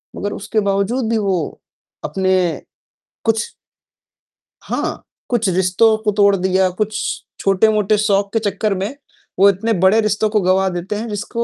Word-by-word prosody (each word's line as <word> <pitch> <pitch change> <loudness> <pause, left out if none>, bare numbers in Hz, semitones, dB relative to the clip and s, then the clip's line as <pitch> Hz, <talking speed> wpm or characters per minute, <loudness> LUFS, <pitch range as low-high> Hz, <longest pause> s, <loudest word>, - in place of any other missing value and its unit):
मगर 205 +1 -3
उसके 215 +2 -2
बावजूद 220 +5 0
भी 230 - +1
वो 195 -3 0 0.7
अपने 185 -3 0 0.6
कुछ 225 -1 +1 1.2
हाँ, - - -3 0.3
कुछ 230 -4 +1
रिश्तों 190 +5 +3
को 210 - +2
तोड़ 200 -1 +4
दिया, 190 0 +1
कुछ 210 +4 -3 0.4
छोटे-मोटे 210 +1 +2
शौक 200 -1 +1
के 225 - +2
चक्कर 205 +1 -1
में 195 +8 -4 0.4
वो 200 +1 +7
इतने 220 +4 0
बड़े 190 +4 +4
रिश्तों 215 0 0
को 210 -1 +1
गँवा 190 +1 +2
देते 180 +3 -4
हैं 225 +3 -4
जिसको 215 +3 -3
205 Hz, 145 wpm, -18 LUFS, 190-215 Hz, 1.2 s, वो